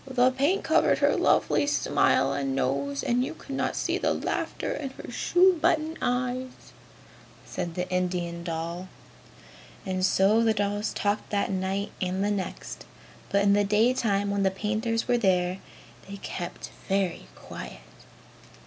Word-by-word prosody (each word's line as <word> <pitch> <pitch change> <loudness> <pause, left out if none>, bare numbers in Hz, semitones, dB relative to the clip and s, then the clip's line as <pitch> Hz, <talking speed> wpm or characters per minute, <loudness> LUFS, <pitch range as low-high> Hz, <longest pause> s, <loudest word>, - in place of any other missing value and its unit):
"The 255 0 +4
paint 285 +9 +1
covered - - +3
her - - +3
lovely 285 - +2
smile 290 - +2
and 135 -1 -1
nose 140 +1 -1
and 245 +1 +1
you - - -4
could 275 - -9
not - - -1
see - - -1
the - - +1
laughter - - -2
in 280 -2 -3
her 265 - -10
shoe 355 +7 +3
button 320 -1 +2
eyes!" 250 +1 -2 0.7
said 170 -1 -5
the 180 0 -2
Indian 175 -2 -1
doll. 170 +2 -4 1.0
And 185 -1 -2
so 195 +4 +4
the 220 -1 +3
dolls 205 0 -1
talked 205 +1 -1
that 200 -1 0
night 190 +2 -2
and 185 +1 -1
the 205 - +1
next. 195 -2 -5 0.4
But 200 0 +2
in 200 0 +5
the 205 0 +4
daytime 210 -1 +2
when 200 0 0
the 195 - +3
painters 220 +4 -1
were 245 -1 +3
there, 185 -3 +1 0.5
they 200 - -6
kept 175 -2 -6 0.2
very 195 -3 0
quiet. - - -9
200 Hz, 150 wpm, -27 LUFS, 185-245 Hz, 1.0 s, in